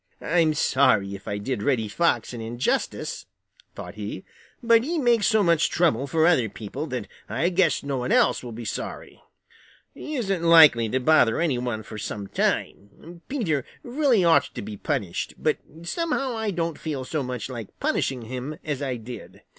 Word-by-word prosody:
"I'm 160 -1 +2
sorry 110 -9 +3
if 100 0 -10
I 100 - -2
did 105 +2 -3
Reddy 115 -2 +1
Fox 170 +5 0
an 120 - -6
injustice," 120 +3 -2 0.5
thought - - -8
he, 105 -2 -6 0.4
"but 230 -1 +5
he 330 +6 -2
makes 240 -7 +3
so 220 -2 +3
much 170 -2 +3
trouble 145 -6 +1
for 160 +3 +2
other 135 -10 +3
people 115 +9 -6
that 125 -6 -4 0.2
I 170 - +1
guess 180 -4 +2
no 140 -1 -2
one 125 0 -2
else - - +3
will 120 - -7
be 115 +1 -7
sorry. - - -6 0.7
He 310 - -6
isn't 195 -8 -1
likely 155 -9 +7
to 130 - 0
bother 125 -4 +4
any 150 -8 +1
one 120 -3 -3
for 105 0 -8
some 105 -1 -5
time. 130 - -3
Peter 180 - -1 0.2
really 245 - +2
ought 165 -1 +5
to - - -4
be 105 +1 -6
punished, 95 -3 -3
but - - 0 0.2
somehow 275 - -1
I 220 -1 -2
don't 170 -4 -2
feel 145 -5 -4
so 155 +2 -2
much 125 -2 -4
like 120 -5 -8
punishing 130 -3 -1
him 130 +6 -6
as 145 -3 -3
I 135 -3 -2
did. 120 +1 -10
140 Hz, 180 wpm, -25 LUFS, 115-170 Hz, 0.7 s, likely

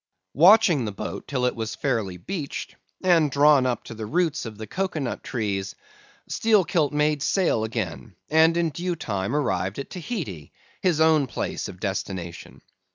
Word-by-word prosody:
"Watching 175 - +6
the 105 - -3
boat 100 - -6
till 130 -3 -1
it 125 - 0
was 115 0 -4
fairly 110 -10 -1
beached, 150 - -5 0.3
and 170 -5 +4
drawn 140 -1 +5
up 125 - -2
to - - -9
the 110 -1 -6
roots 165 -3 0
of 110 -2 -9
the 110 - -6
cocoa 185 - -3
nut 135 -4 -3
trees, 100 -5 -3 0.5
Steelkilt 185 -9 +2
made 150 0 +1
sail 175 - +1
again, 110 -3 -4
and 160 +2 +4
in 170 -2 +1
due 175 +3 -2
time 100 -6 -3
arrived 95 -9 -1
at 140 - -6
Tahiti, 160 - -5 0.3
his 175 -4 +2
own 160 -3 +4
place - - -3
of 90 - -10
destination. 95 -3 -5
140 Hz, 160 wpm, -25 LUFS, 110-165 Hz, 0.5 s, Watching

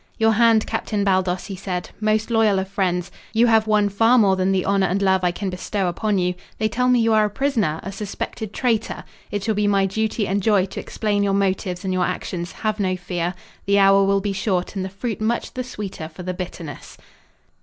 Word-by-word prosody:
"Your 225 0 +4
hand, 225 0 +4
Captain 215 -2 -2
Baldos," 185 -2 +1
he 195 - -6
said. 180 -1 -4
"Most 215 +1 0
loyal 220 -3 +3
of 190 0 -1
friends. 185 -2 -1 0.2
You 230 +2 +4
have 220 -2 +4
won 210 -1 +3
far 225 +5 +4
more 200 -5 +5
than 190 +1 +1
the 190 -1 +1
honor 195 -1 +2
and 185 +3 0
love 190 -2 +2
I 180 - +3
can 190 +2 -3
bestow 190 +2 -2
upon 200 +4 0
you. 180 -1 +1 0.2
They 215 - +1
tell 250 +3 0
me 250 -1 +4
you 225 -1 +3
are 215 -1 +4
a - - -1
prisoner, 215 - 0
a 195 - -5
suspected 205 +1 -5
traitor. 230 -2 -1 0.3
It 205 -1 -3
shall 220 - +1
be 210 0 +1
my 195 -1 +3
duty 220 +2 -1
and 200 +2 0
joy 200 -2 +3
to 195 - -7
explain 205 -2 -1
your 200 -1 +1
motives 190 -1 -1
and 190 - -1
your 185 -1 +1
actions. 180 -1 -4
Have 215 -1 -3
no 185 -2 +1
fear. 175 0 -3 0.3
The 200 0 +4
hour 195 0 +6
will 195 0 +2
be 200 0 -2
short 190 -1 -1
and 190 - -2
the 190 - -4
fruit 215 +3 -4
much 230 +2 -1
the 255 - -3
sweeter 200 -9 -6
for 165 +3 -10
the 185 +1 -3
bitterness." 175 -5 -8
200 Hz, 225 wpm, -22 LUFS, 185-215 Hz, 0.3 s, hour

